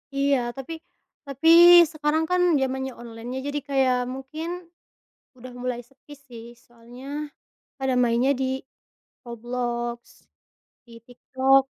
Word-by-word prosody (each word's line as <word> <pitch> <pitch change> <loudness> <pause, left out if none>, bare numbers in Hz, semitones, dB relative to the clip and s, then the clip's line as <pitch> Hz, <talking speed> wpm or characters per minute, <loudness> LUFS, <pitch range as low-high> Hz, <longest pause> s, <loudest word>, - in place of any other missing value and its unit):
Iya, 275 0 +2 0.2
tapi 270 +4 -7 0.5
tapi 280 +2 0 0.4
sekarang 310 0 0
kan 360 0 +2 0.2
zamannya 265 0 -2
online, 230 0 -9
iya. 260 - -4
Jadi 290 0 -2
kayak 265 -2 +2 0.2
mungkin 320 +7 -7 0.7
sudah 255 0 -12
mulai 250 -1 -3
sepi 275 +2 -16
sih, 255 -5 -13 0.2
soalnya 240 +2 -15 0.7
pada 265 -1 0
mainnya 240 +3 +2
di 265 0 -1 0.7
Roblox, 240 0 -5 0.6
di 235 - -17
TikTok. 260 +2 +2
260 Hz, 110 wpm, -24 LUFS, 240-275 Hz, 0.7 s, Iya